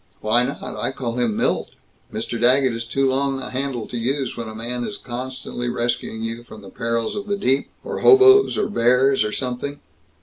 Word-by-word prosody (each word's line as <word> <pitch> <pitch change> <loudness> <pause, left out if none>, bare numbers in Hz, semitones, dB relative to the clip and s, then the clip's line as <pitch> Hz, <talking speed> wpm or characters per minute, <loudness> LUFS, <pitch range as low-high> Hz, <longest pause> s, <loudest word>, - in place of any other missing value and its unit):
"Why 110 +3 +3
not? 135 +3 -4
I - - -3
call 125 -2 -4
him 115 -4 0
'Milt.' - - -1 0.4
'Mr. 115 +2 -4
Daggett' 130 +1 +4
is 115 0 -5
too 135 +3 +1
long 135 +1 0
a - - -7
handle 130 -3 -3
to 120 - -5
use 130 +2 -1
when 115 -1 -5
a 110 - -9
man 120 +2 -4
is 205 - -4
constantly 125 0 -5
rescuing 120 -2 -2
you 115 +1 -4
from 110 -3 -12
the 95 - -11
perils 115 - -2
of 205 0 -5
the 200 0 0
deep 135 -7 +1
or - - -4
hoboes 400 0 +7
or - - +1
bears 130 - +3
or 105 - -2
something. 130 +4 -4
125 Hz, 200 wpm, -22 LUFS, 115-135 Hz, 0.4 s, hoboes